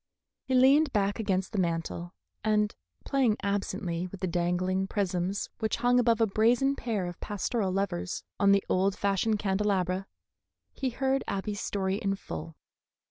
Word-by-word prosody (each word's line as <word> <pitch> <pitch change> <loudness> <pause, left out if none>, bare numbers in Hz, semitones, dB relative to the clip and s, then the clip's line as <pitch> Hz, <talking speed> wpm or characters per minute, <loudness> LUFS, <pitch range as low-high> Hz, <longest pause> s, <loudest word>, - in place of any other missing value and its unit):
He 260 - -1
leaned 275 +4 +5
back 205 0 +1
against 190 -3 0
the 210 - -1
mantel, 170 0 -2 0.3
and 210 -1 +2 0.3
playing 255 -6 +2
absently 190 -3 -2
with 185 +1 -10
the - - +1
dangling 180 +2 0
prisms 190 -1 -1
which 220 -1 0
hung 245 +1 +3
above 235 -2 +3
a 225 - +5
brazen 235 +6 +3
pair 220 -8 -2
of 175 -1 -6
pastoral 205 0 -1
lovers 180 - -2 0.2
on 200 - +5
the 200 0 +3
old 190 +1 +1
fashioned 200 +2 +1
candelabra, 195 -2 0 0.7
he 265 - -2
heard 265 +2 0
Abby's 200 +1 -3
story 190 -1 -1
in 195 -1 -1
full. 165 -4 -7
200 Hz, 150 wpm, -29 LUFS, 185-225 Hz, 0.7 s, leaned